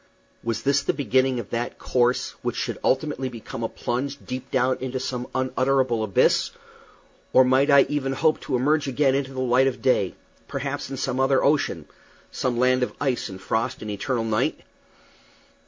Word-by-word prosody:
Was 115 -1 -2
this 140 +1 +3
the - - 0
beginning 130 -2 +1
of 105 - -8
that 120 +1 -3
course 125 0 +1
which - - -2
should - - -3
ultimately 135 -2 0
become 115 -1 -8
a 115 - -1
plunge 135 +4 -3
deep 130 0 -6
down 130 0 +1
into 130 0 -3
some 125 -1 -4
unutterable 130 -2 +1
abyss? 100 -4 +3 0.8
or 130 - +7
might 130 +3 +3
I 140 -1 +7
ever 135 -2 -1
hope 155 +3 +2
to 130 - -2
emerge 145 +4 +2
again 135 0 +2
into 135 -1 -1
the 130 - -2
light 130 +1 +3
of 130 -2 -2
day 115 -7 +1 0.3
perhaps - - -4
in 135 - -5
some 130 - -2
other 135 0 +3
ocean 145 0 +1 0.4
some 125 -2 -1
land 130 +1 +3
of 125 - -2
ice 135 -5 -1
and 95 -1 -8
frost 110 +4 -2
and 105 - -4
eternal 115 +4 -2
night? 110 -1 0
130 Hz, 175 wpm, -24 LUFS, 120-135 Hz, 0.8 s, or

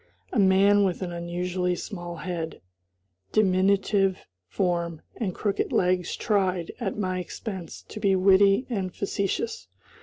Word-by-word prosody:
A 240 - +2
man 200 +1 +5
with 190 -1 0
an 175 - -4
unusually 180 +1 -2
small 175 -2 -6
head, 170 -1 -4 0.7
diminutive 195 -1 +2 0.2
form, 170 - -1
and 195 -7 -2
crooked 205 -2 -1
legs 180 -1 +1
tried, 190 -5 0
at 210 -5 -3
my 185 -3 -1
expense, 185 -1 -7
to - - -9
be 200 -2 +3
witty 195 +4 +5
and 195 -7 -3
facetious. 305 - -2
190 Hz, 125 wpm, -26 LUFS, 180-200 Hz, 0.7 s, man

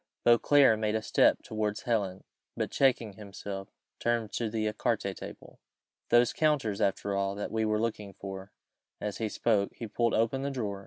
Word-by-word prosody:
Beauclerc 120 0 +5
made 105 0 0
a 110 - 0
step - - +3
towards 105 -1 -2
Helen, 100 -6 -1 0.3
but - - -2
checking 120 -6 +2
himself, 100 -1 -7
he - - -41 0.3
turned 115 -3 0
to 115 -2 -2
the 110 0 -1
ecarté 105 0 -1
table. - - -10 0.5
"Those 120 0 +5
counters, 145 -10 +1
after 100 +1 0
all, 100 0 0
that 105 - -4
we 110 0 0
were 110 0 +1
looking 105 -3 -3
for 95 0 -8 0.3
" - - -60
As 105 -1 -4
he 110 -1 -1
spoke 105 -2 +1
he 115 - -6
pulled 115 +2 0
open 115 +4 +1
the 140 - -1
drawer. 105 -7 -3
110 Hz, 180 wpm, -30 LUFS, 100-115 Hz, 0.5 s, Beauclerc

